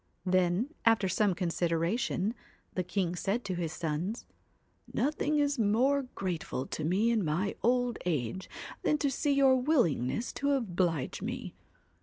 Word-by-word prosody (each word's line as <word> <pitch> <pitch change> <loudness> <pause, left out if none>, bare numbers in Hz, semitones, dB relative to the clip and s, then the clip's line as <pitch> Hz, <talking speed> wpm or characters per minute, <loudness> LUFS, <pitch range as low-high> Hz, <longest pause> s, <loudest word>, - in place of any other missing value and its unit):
Then, 185 - +2
after 225 -4 +4
some 190 +1 +2
consideration, 175 +4 0 0.4
the 185 - 0
king 180 -1 -1
said 205 +7 -1
to 190 - -2
his 170 -3 -2
sons: 170 +6 -3 0.3
' - - -42 0.3
Nothing 300 +2 +1
is 285 -2 +1
more 255 +6 +2
grateful 170 -8 -3
to 155 - -5
me 195 +9 +2
in 225 -3 +2
my 175 +6 0
old 245 0 +1
age 155 +2 -2 0.3
than 300 - +2
to 285 -2 0
see 285 +2 +1
your 270 -1 +5
willingness 240 - +1
to 280 0 +1
oblige 180 - -1
me. - - -4
200 Hz, 145 wpm, -31 LUFS, 175-250 Hz, 0.4 s, your